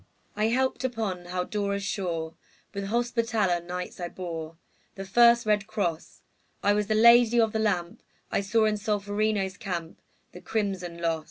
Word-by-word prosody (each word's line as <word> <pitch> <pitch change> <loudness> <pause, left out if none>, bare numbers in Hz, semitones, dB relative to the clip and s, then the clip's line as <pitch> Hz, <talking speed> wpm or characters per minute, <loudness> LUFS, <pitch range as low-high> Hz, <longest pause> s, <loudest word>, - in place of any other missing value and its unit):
I 210 +1 +1
helped 260 +2 0
upon 220 -8 -3
Haldora's 200 +3 -2
shore; 170 -5 -3 0.4
With 200 0 -4
Hospitaller 230 -4 0
Knights 180 +1 -6
I 175 -1 -4
bore 165 -3 -6 0.4
The 195 - -6
first 235 +3 +5
red 210 -1 +1
cross; 190 -7 -3 0.4
I 205 - +4
was 210 0 0
the 215 - +1
Lady 235 +1 +6
of 225 -2 +2
the 220 - 0
Lamp; 180 -5 -1 0.3
I - - +1
saw 220 +3 +2
in 215 -1 +1
Solferino's 205 -2 -1
camp 170 -4 -5 0.3
The - - -11
crimson 190 -5 -3
loss. 165 -1 0
200 Hz, 155 wpm, -27 LUFS, 180-220 Hz, 0.4 s, Lady